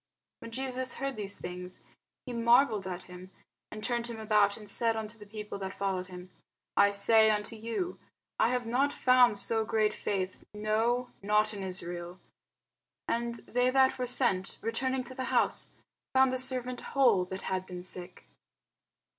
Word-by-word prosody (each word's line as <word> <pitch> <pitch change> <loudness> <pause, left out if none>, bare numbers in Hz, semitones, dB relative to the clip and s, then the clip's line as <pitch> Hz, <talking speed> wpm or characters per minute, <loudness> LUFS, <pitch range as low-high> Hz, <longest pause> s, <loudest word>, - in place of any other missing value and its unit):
When 230 - -9
Jesus 260 +1 -3
heard 275 -1 -3
these 200 -2 -4
things, 180 +1 -7 0.4
he 250 - -6
marvelled 235 -3 +3
at 180 0 -5
him, 180 +1 -11 0.4
and 215 0 -8
turned 240 0 -1
him 230 -2 -7
about, 210 -2 +3
and 210 -2 -11
said 225 +3 +1
unto 220 0 -5
the 210 - -12
people 210 -1 -7
that 190 0 -5
followed 190 -2 -2
him, 180 0 -10 0.4
I 200 - +6
say 220 +2 +5
unto 210 +1 -1
you, 230 +11 -4 0.4
I 225 - +4
have 250 -1 -1
not 260 +5 +1
found 250 -5 +4
so 225 +2 +1
great 215 -1 +1
faith, 190 -2 -3
no, 225 +4 0
not 210 +2 +2
in 200 - -6
Israel. 175 -1 -5 0.9
And 235 0 -1
they 250 +1 +2
that 265 0 +3
were 250 - -1
sent, 235 -7 +1
returning 260 +3 -1
to 255 +1 -9
the 260 0 -4
house, - - +2 0.4
found 265 0 +5
the 255 - 0
servant 255 -1 +2
whole 240 -9 +3
that 190 +1 -7
had 185 0 -2
been 180 -1 -7
sick. 180 0 -8
220 Hz, 165 wpm, -30 LUFS, 195-250 Hz, 0.9 s, I